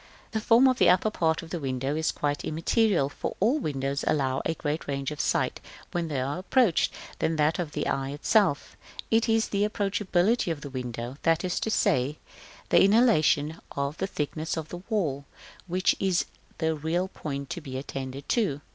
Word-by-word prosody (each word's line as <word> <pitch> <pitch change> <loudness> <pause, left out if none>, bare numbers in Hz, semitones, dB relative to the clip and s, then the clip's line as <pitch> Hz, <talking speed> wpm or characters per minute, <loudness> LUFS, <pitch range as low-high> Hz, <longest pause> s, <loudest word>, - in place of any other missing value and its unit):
The 220 - -1
form 235 +4 +6
of 255 -1 +2
the - - +6
upper 185 +4 +3
part 160 -5 0
of 165 - -11
the 175 - -2
window 135 0 -2
is 160 0 +1
quite 145 0 -2
immaterial, 170 - +2
for 145 - -5
all 240 +10 +3
windows 140 - -2
allow 135 -3 +1
a 165 - 0
greater 150 +1 -3
range 140 +1 -2
of 150 - -7
sight - - 0 0.3
when 175 -1 -1
they 145 -4 -2
are 140 +6 -2
approached 200 -1 +2 0.3
than 160 - +1
that 155 +1 +2
of 160 -4 -3
the - - -2
eye 135 0 -1
itself: 145 +2 +1 0.4
it 225 +1 +3
is 225 0 +2
the 200 - 0
approachability 205 -1 +1
of 150 -3 -4
the 140 - -7
window, 125 0 -5
that 165 +1 +2
is 180 - -1
to - - -2
say, 140 - +1 0.5
the - - +6
annihilation 175 - +3
of 140 +1 -2
the 190 - -1
thickness 155 -1 -3
of 155 -1 -4
the 175 - -7
wall, 150 - -1 0.4
which 185 +1 +2
is 190 -2 +1 0.3
the 160 -1 +1
real 160 +4 -1
point 140 -6 -6
to 175 - -4
be 130 -4 -6
attended 135 0 -6
to. 195 - +1
160 Hz, 190 wpm, -27 LUFS, 140-195 Hz, 0.5 s, form